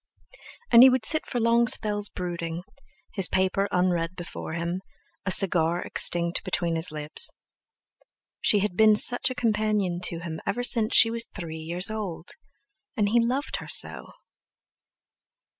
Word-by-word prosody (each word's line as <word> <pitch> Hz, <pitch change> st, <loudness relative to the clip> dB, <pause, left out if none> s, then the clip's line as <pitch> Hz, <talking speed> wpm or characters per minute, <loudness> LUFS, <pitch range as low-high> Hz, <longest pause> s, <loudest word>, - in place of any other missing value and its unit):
And 235 Hz, -, +7 dB
he 260 Hz, -, +9 dB
would 255 Hz, -3 st, -1 dB
sit 310 Hz, -, +2 dB
for 245 Hz, -, -3 dB
long 235 Hz, +1 st, +2 dB
spells 205 Hz, -2 st, +2 dB
brooding, 170 Hz, -1 st, -6 dB, 0.5 s
his 195 Hz, -4 st, +5 dB
paper 190 Hz, +1 st, 0 dB
unread 180 Hz, -1 st, -1 dB
before 170 Hz, -2 st, -8 dB
him, 170 Hz, +2 st, -4 dB, 0.5 s
a -, -, +1 dB
cigar 175 Hz, -3 st, +3 dB
extinct 170 Hz, 0 st, +3 dB
between 170 Hz, -2 st, -2 dB
his 165 Hz, 0 st, -2 dB
lips. 150 Hz, 0 st, -1 dB, 1.1 s
She 205 Hz, -, +2 dB
had 200 Hz, -3 st, -3 dB
been 215 Hz, +1 st, +4 dB
such 245 Hz, +4 st, +2 dB
a 255 Hz, -, -6 dB
companion 210 Hz, -6 st, -1 dB
to 170 Hz, -2 st, -4 dB
him 160 Hz, -2 st, -7 dB
ever 240 Hz, +5 st, -3 dB
since 230 Hz, -2 st, +1 dB
she 225 Hz, -, +6 dB
was 230 Hz, 0 st, +1 dB
three 165 Hz, -4 st, -8 dB
years 175 Hz, +6 st, -1 dB
old! 195 Hz, -6 st, -6 dB, 0.7 s
And 205 Hz, -2 st, 0 dB
he 235 Hz, +2 st, +2 dB
loved 260 Hz, +5 st, -3 dB
her -, -, -10 dB
so! -, -, 0 dB
190 Hz, 150 wpm, -25 LUFS, 170-220 Hz, 1.1 s, he